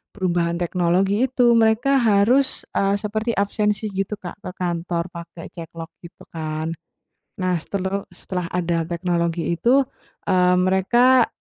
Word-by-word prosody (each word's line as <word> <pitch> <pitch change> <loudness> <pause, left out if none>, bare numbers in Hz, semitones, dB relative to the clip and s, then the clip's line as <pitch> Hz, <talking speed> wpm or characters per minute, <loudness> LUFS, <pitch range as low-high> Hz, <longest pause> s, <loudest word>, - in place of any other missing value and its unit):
perubahan 175 -3 0
teknologi 180 +6 +1
itu. 250 -2 +3
Mereka 230 +4 +3
harus, 235 +4 +3
eee, 195 0 +1
seperti 215 +3 -2
absensi 210 +1 0
gitu 195 +2 -2
Kak 190 -1 -9
ke 195 - -7
kantor 175 -1 -2
pakai 170 -1 -10
ceklok 165 -1 -9
gitu 170 - -14
kan. 155 0 -3 0.7
Nah, 180 -1 +1
seteleh 195 +3 -3
setelah 180 0 -4
ada 170 -2 0
teknologi 170 -1 -1
itu, 235 +11 +3 0.5
eee, 180 -1 +4
mereka 240 +7 +4
185 Hz, 125 wpm, -22 LUFS, 170-215 Hz, 0.7 s, eee